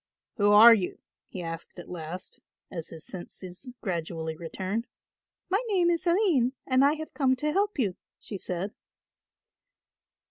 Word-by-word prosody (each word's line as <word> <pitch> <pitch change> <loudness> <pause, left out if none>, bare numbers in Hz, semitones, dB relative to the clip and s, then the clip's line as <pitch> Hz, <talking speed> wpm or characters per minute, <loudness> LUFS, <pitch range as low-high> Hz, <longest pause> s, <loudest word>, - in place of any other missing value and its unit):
"Who 205 -1 +4
are 225 +3 +10
you?" 195 -5 -1 0.3
he 180 - -6
asked 165 +1 -7
at 175 - -9
last, 175 +1 -7 0.3
as 165 -3 -5
his 160 -1 -8
senses 185 +6 -7
gradually 165 -4 -3
returned. 190 +7 -3 0.6
"My 390 +6 +1
name 360 -5 +3
is 340 +1 -1
Aline 340 - +3
and 260 0 +4
I 285 +1 +5
have 315 0 -7
come 260 -3 +3
to 300 +4 -1
help 405 +2 +1
you," 205 -9 +1 0.2
she 210 - -8
said. 185 +1 -3
205 Hz, 145 wpm, -28 LUFS, 175-290 Hz, 0.6 s, are